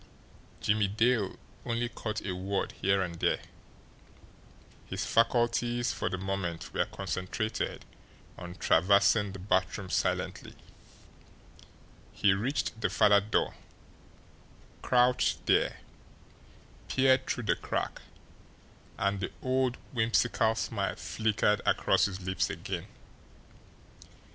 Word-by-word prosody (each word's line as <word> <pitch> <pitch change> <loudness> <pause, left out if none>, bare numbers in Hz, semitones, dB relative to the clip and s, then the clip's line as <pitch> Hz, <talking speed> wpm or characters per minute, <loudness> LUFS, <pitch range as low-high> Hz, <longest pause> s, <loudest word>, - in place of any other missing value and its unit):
Jimmie 105 -1 +2
Dale 110 0 +1 0.3
only 120 0 -1
caught 110 -2 -5
a 95 -3 -2
word 95 +2 -2
here 95 0 +1
and 85 -2 -6
there - - +2 1.5
his 95 +1 -3
faculties 120 +2 +2
for - - -2
the 95 - -3
moment 95 -3 -4
were - - +1
concentrated 100 +4 -3 0.5
on 90 0 -8
traversing 100 +4 +3
the 95 - -8
bathroom 95 0 -1
silently. - - -1 1.6
He 100 - +3
reached 115 +2 -2
the - - +1
farther 105 -1 +5
door, 105 +2 0 1.3
crouched 125 0 +2
there, - - +2 1.1
peered 130 0 +3
through 120 - -2
the 105 - +2
crack - - -3 1.0
and 100 0 0
the 95 - -3
old 130 -1 +1 0.2
whimsical 115 -1 +2
smile 100 -4 -2
flickered 105 -1 0
across - - +3
his 95 -2 -4
lips 95 0 -1
again. - - -5
105 Hz, 105 wpm, -30 LUFS, 95-120 Hz, 1.6 s, farther